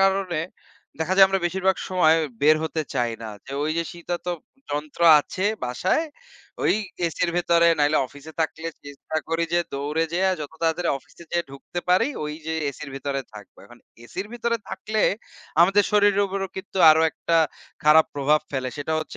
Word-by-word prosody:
কারণে 195 Hz, -4 st, +2 dB, 0.6 s
দেখা 165 Hz, +4 st, 0 dB
যায় 195 Hz, -, +9 dB
আমরা 195 Hz, 0 st, 0 dB
বেশিরভাগ 190 Hz, +1 st, +1 dB
সময় 175 Hz, -4 st, +4 dB, 0.3 s
বের 155 Hz, +2 st, +6 dB
হতে 160 Hz, 0 st, -2 dB
চাই 120 Hz, -1 st, 0 dB
না। 110 Hz, -, -5 dB, 0.4 s
ওই 155 Hz, -, 0 dB
যে -, -, +2 dB
শীতাত 175 Hz, +1 st, -5 dB, 0.4 s
যন্ত্র 150 Hz, +2 st, -5 dB, 0.2 s
আছে 185 Hz, +6 st, -5 dB, 0.2 s
বাসায়। 185 Hz, -, 0 dB, 0.6 s
ওই -, -, +4 dB, 0.3 s
এসির 170 Hz, +1 st, -1 dB
ভেতরে 170 Hz, -1 st, +3 dB
নাইলে 145 Hz, +1 st, +3 dB
অফিসে 145 Hz, +4 st, -13 dB
থাকলে 160 Hz, +1 st, -2 dB, 0.2 s
চেষ্টা 145 Hz, +2 st, -6 dB
করি 165 Hz, +1 st, 0 dB
যে 175 Hz, -, +3 dB
দৌড়ে 150 Hz, +4 st, -1 dB
যাইয়া 190 Hz, +2 st, +2 dB
যত 150 Hz, 0 st, -6 dB
তাড়াতাড়ি 165 Hz, +1 st, +1 dB
অফিসে 135 Hz, -, -18 dB
যাইয়া 170 Hz, 0 st, 0 dB
ঢুকতে 140 Hz, +5 st, -7 dB
পারি, 180 Hz, +8 st, +4 dB, 0.2 s
ওই 150 Hz, 0 st, -4 dB
যে 160 Hz, -, -2 dB, 0.2 s
এসির 140 Hz, 0 st, -9 dB
ভেতরে 135 Hz, 0 st, -3 dB
থাকব। 105 Hz, -2 st, -13 dB
এখন 120 Hz, -, -16 dB, 0.3 s
এসির 190 Hz, +11 st, -6 dB
ভিতরে 235 Hz, 0 st, -1 dB
থাকলে 215 Hz, +3 st, -2 dB, 0.6 s
আমাদের 195 Hz, +4 st, +5 dB
শরীরের 205 Hz, -1 st, +4 dB
উপরও 195 Hz, 0 st, -3 dB
কিন্তু 190 Hz, 0 st, -6 dB
আরো 155 Hz, -, +5 dB
একটা 165 Hz, -, -1 dB, 0.5 s
খারাপ 155 Hz, +1 st, +7 dB
প্রভাব 145 Hz, +2 st, +2 dB
ফেলে। 130 Hz, -2 st, -2 dB
সেটা 145 Hz, +2 st, -3 dB
হচ্ছে 155 Hz, -, -6 dB
165 Hz, 165 wpm, -24 LUFS, 150-190 Hz, 0.6 s, যায়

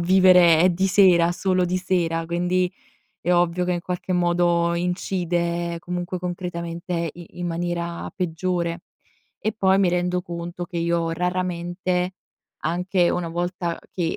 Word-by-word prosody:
vivere 180 Hz, -2 st, +6 dB
di 190 Hz, +2 st, +1 dB
sera 180 Hz, -3 st, +5 dB
solo 185 Hz, 0 st, +1 dB
di 180 Hz, +1 st, 0 dB
sera, 165 Hz, -3 st, 0 dB
quindi 180 Hz, +1 st, 0 dB, 0.5 s
è 175 Hz, -, 0 dB
ovvio 175 Hz, 0 st, +2 dB
che 180 Hz, -, +1 dB
in 175 Hz, -, -2 dB
qualche 180 Hz, +1 st, -3 dB
modo 175 Hz, -1 st, +2 dB
incide 175 Hz, -1 st, -1 dB
comunque 180 Hz, +1 st, -4 dB
concretamente 170 Hz, -1 st, -4 dB
i 175 Hz, 0 st, -12 dB
in 175 Hz, -, -2 dB
maniera 170 Hz, 0 st, -3 dB
peggiore. 175 Hz, -1 st, -2 dB, 0.6 s
E 215 Hz, -, -1 dB
poi 190 Hz, -2 st, +3 dB
mi 190 Hz, -2 st, +4 dB
rendo 180 Hz, +1 st, 0 dB
conto 175 Hz, 0 st, -6 dB
che 175 Hz, 0 st, -6 dB
io 170 Hz, 0 st, 0 dB
raramente, 180 Hz, +1 st, -1 dB, 0.5 s
anche 175 Hz, +2 st, +1 dB
una 180 Hz, -1 st, -1 dB
volta 175 Hz, 0 st, -2 dB
che 170 Hz, -3 st, -1 dB
175 Hz, 135 wpm, -23 LUFS, 170-180 Hz, 0.6 s, vivere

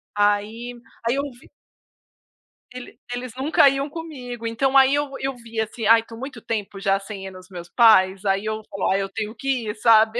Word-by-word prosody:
Aí 210 Hz, +4 st, 0 dB, 0.3 s
aí 245 Hz, -, +2 dB
eu 280 Hz, -, 0 dB
vi 245 Hz, -, -19 dB, 1.2 s
Ele 250 Hz, -2 st, -10 dB, 0.2 s
eles 245 Hz, -1 st, -5 dB
nunca 280 Hz, +1 st, +4 dB
iam 275 Hz, +2 st, -2 dB
comigo, 255 Hz, -8 st, -7 dB
então 265 Hz, +4 st, +2 dB
aí 270 Hz, +1 st, +6 dB
eu 290 Hz, -1 st, -1 dB
eu 270 Hz, -1 st, -2 dB
via 230 Hz, -2 st, -3 dB
assim, 225 Hz, 0 st, -7 dB
ai 225 Hz, +1 st, +6 dB
tô 230 Hz, 0 st, -12 dB
muito 265 Hz, -2 st, -8 dB
tempo 205 Hz, -3 st, -4 dB
já 195 Hz, 0 st, +1 dB
sem 195 Hz, -1 st, -8 dB
ir 190 Hz, -, -7 dB
nos 185 Hz, 0 st, -13 dB
meus 175 Hz, -2 st, -9 dB
pais? 195 Hz, -3 st, +5 dB
Aí 195 Hz, +1 st, +1 dB
eu 215 Hz, 0 st, -2 dB
falo: 195 Hz, -2 st, -1 dB
"Ai, 195 Hz, +1 st, +2 dB
eu 195 Hz, -, -3 dB
tenho 220 Hz, +1 st, -5 dB
que 265 Hz, -5 st, -2 dB
ir", 210 Hz, -, -3 dB
sabe? 220 Hz, +1 st, +4 dB
230 Hz, 200 wpm, -23 LUFS, 205-255 Hz, 1.2 s, aí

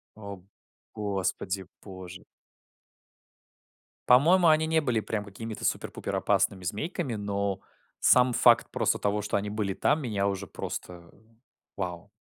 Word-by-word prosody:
О, 100 Hz, -3 st, -9 dB, 0.5 s
господи 95 Hz, -2 st, -2 dB, 0.2 s
боже. 95 Hz, -2 st, -10 dB, 1.9 s
По-моему, 170 Hz, +8 st, +6 dB
они 160 Hz, 0 st, +4 dB
не 160 Hz, 0 st, +2 dB
были 125 Hz, -6 st, 0 dB
прям 105 Hz, -1 st, -3 dB
какими-то 110 Hz, +2 st, -8 dB
супер-пупер -, -, -2 dB
опасными 95 Hz, -1 st, +1 dB
змейками, 115 Hz, -, -3 dB
но 100 Hz, -2 st, -2 dB, 0.4 s
сам 125 Hz, 0 st, +5 dB
факт -, -, +5 dB
просто -, -, 0 dB
того, 105 Hz, +1 st, 0 dB
что 105 Hz, -, -1 dB
они 100 Hz, +1 st, -3 dB
были 105 Hz, -2 st, -2 dB
там, 150 Hz, +10 st, +1 dB
меня 105 Hz, -6 st, -1 dB
уже 100 Hz, -2 st, -2 dB
просто 85 Hz, -1 st, -7 dB, 0.7 s
вау. 90 Hz, -4 st, -5 dB
105 Hz, 125 wpm, -28 LUFS, 95-120 Hz, 1.9 s, По-моему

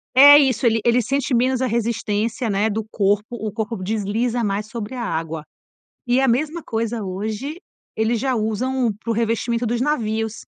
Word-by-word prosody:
é 285 Hz, +2 st, +10 dB
isso, 265 Hz, -2 st, +2 dB
ele 225 Hz, -1 st, +3 dB
ele 240 Hz, +1 st, +3 dB
sente 275 Hz, +3 st, -1 dB
menos 255 Hz, +1 st, +1 dB
a 260 Hz, -, +1 dB
resistência, 230 Hz, 0 st, -1 dB
né, 205 Hz, +2 st, +1 dB
do 220 Hz, +1 st, -2 dB
corpo, 205 Hz, 0 st, +1 dB
o 215 Hz, -2 st, -4 dB
corpo 220 Hz, +1 st, -3 dB
desliza 225 Hz, +4 st, -1 dB
mais 205 Hz, +1 st, -1 dB
sobre 230 Hz, +2 st, -6 dB
a 240 Hz, -, -4 dB
água, 160 Hz, -3 st, -3 dB, 0.6 s
e 245 Hz, +2 st, +3 dB
a 270 Hz, -, +3 dB
mesma 305 Hz, +7 st, -1 dB
coisa 225 Hz, -1 st, -2 dB
hoje 215 Hz, -, -4 dB, 0.4 s
eles 220 Hz, +1 st, +1 dB
já 265 Hz, -1 st, 0 dB
usam 230 Hz, +2 st, 0 dB
para 230 Hz, -, -2 dB
o -, -, +1 dB
revestimento 230 Hz, +1 st, 0 dB
dos 240 Hz, +1 st, -1 dB
navios. 225 Hz, -6 st, -1 dB
230 Hz, 180 wpm, -21 LUFS, 215-250 Hz, 0.6 s, é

